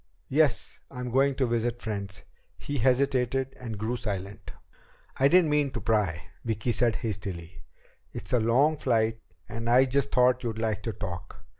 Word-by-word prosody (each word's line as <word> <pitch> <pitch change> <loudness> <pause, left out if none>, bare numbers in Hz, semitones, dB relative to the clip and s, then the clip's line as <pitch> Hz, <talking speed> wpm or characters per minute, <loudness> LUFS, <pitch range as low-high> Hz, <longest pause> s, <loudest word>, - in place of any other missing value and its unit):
Yes, 150 -1 +2
I'm 125 -2 -6
going 135 +2 +3
to 130 - +1
visit 120 0 -1
friends." 100 -5 -5 0.3
He 145 -1 -4
hesitated 130 +1 +1
and 115 -4 -6
grew 110 +4 -2
silent. 100 -3 -5 0.7
"I 135 - +5
didn't 170 0 +4
mean 150 -1 +2
to 120 - -3
pry," 100 -8 0 0.2
Vicki 115 +1 -1
said 120 -1 +2
hastily. 95 -6 -5 0.5
"It's - - -7
a 125 - +4
long 130 +8 +3
flight 115 -4 +1 0.3
and 115 0 -4
I 125 +2 +6
just 140 +1 0
thought 125 0 +4
you'd 115 -2 -3
like 110 -2 -1
to 115 - -3
talk. 95 -3 -7
120 Hz, 160 wpm, -28 LUFS, 105-130 Hz, 0.7 s, I